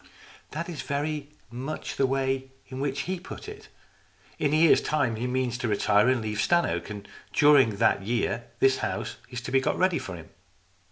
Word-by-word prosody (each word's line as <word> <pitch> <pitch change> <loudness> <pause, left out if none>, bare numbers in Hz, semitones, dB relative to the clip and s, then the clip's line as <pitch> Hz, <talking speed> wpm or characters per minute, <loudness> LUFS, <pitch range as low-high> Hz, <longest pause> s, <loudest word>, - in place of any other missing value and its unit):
" - - -23
That 165 +3 -3
is 165 -5 -5
very 145 0 -3 0.2
much 130 +6 -5
the 135 - +3
way 135 0 -1 0.2
in 130 - -6
which 140 0 -1
he 185 +1 -3
put 190 - -9
it. 425 - -10 0.7
In 145 -2 +1
a - - +3
year's 160 +1 +6
time 140 -7 0
he 120 +3 -2
means 125 -1 -1
to 120 - -1
retire 105 +1 +3
and 125 -3 +1
to - - -3
leave 105 -1 -3
Stannoke. 105 - +1
And 105 -1 -7 0.3
during 140 -7 +5
that 110 -1 +3
year 115 +2 -1
this 135 +2 +3
house - - -3
is 125 -2 -5
to - - -6
be 135 - +4
got - - 0
ready 185 -2 +2
for 90 - -6
him." 80 -2 -11
130 Hz, 205 wpm, -27 LUFS, 115-150 Hz, 0.7 s, year's